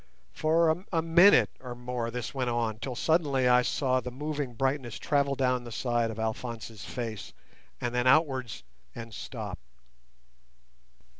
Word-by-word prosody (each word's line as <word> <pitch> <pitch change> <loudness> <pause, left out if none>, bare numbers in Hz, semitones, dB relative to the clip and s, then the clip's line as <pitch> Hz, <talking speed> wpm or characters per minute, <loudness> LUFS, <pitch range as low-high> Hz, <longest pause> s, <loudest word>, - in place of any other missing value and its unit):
For 160 +2 +2
a 165 -3 +1
minute 170 +5 +6
or 125 -2 -7
more 120 -1 -3
this 120 -1 -5
went 130 -3 -1
on, 115 -2 -1
till 125 +1 -4
suddenly 140 -3 +2
I 125 0 +6
saw 130 0 +1
the 125 0 -5
moving 145 -1 -4
brightness 130 -1 -1
travel 140 -1 +1
down 125 -2 +1
the 120 - -9
side 120 0 0
of 110 - -6
Alphonse's 110 -1 -4
face, 115 -4 -6 0.5
and 120 0 -2
then 125 +1 +1
outwards 130 - +2 0.3
and 115 -1 -8
stop. - - -6
125 Hz, 145 wpm, -29 LUFS, 120-140 Hz, 0.5 s, minute